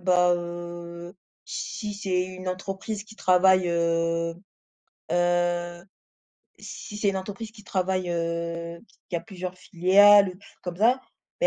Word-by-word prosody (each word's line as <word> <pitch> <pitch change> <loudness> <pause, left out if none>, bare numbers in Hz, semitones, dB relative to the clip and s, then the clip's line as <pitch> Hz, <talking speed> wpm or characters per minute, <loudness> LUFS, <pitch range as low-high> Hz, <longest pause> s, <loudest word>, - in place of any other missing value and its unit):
bah, 180 -1 +4
heu, 175 0 -7 0.3
si 210 -2 -4
c'est 190 -3 0
une 185 0 -7
entreprise 195 +3 -4
qui 220 0 -14
travaille, 185 -1 +4
heu, 165 0 +1 0.8
heu 175 0 +1 0.8
si 210 - -8
c'est 205 -1 +2
une 195 - -1
entreprise 205 +3 -6
qui 215 -2 -15
travaille, 185 -2 -1
heu, 170 0 -3 0.3
qui 180 - -2
a 170 - 0
plusieurs 185 +1 -7
filiales, 195 +2 +6 0.3
comme 175 -1 -5
ça, 230 +6 +5 0.4
beh, - - +3
180 Hz, 125 wpm, -26 LUFS, 175-195 Hz, 0.8 s, filiales